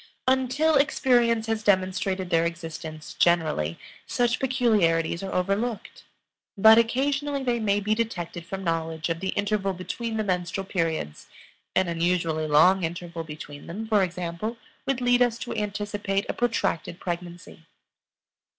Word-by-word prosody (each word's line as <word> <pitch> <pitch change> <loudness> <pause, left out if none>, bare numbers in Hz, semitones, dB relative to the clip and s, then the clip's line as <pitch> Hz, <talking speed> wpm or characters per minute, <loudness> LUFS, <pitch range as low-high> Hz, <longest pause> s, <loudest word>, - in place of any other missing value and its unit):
Until 265 +4 +3
experience 240 -5 +3
has 225 -1 -1
demonstrated 190 -2 0
their 165 -1 +4
existence, 165 -2 -6
generally, 155 - +1 0.3
such 240 0 +1
peculiarities 210 -11 +2
are 195 -1 -5
overlooked. 200 +4 -2 0.5
But 220 +3 +8
occasionally 275 +4 0
they 240 -2 0
may 205 -2 +1
be 210 +1 0
detected 180 -7 -3
from 195 +2 -6
knowledge 165 -1 -2
of 165 0 -1
the 190 +1 -3
interval 200 -1 0
between 220 +5 -4
the 215 - 0
menstrual 185 0 -2
periods; 165 - -2 0.5
an 190 - +3
unusually 165 -2 0
long 180 +6 +5
interval 170 0 -4
between 150 -2 -9
them, 215 +6 -5
for 215 -2 +3
example, 180 +4 -3 0.3
would 270 -2 0
lead 245 0 +3
us 240 -2 +3
to 240 - -5
anticipate 205 -1 -2
a - - -2
protracted 225 -8 -1
pregnancy. 175 -1 -6
195 Hz, 135 wpm, -26 LUFS, 170-230 Hz, 0.5 s, But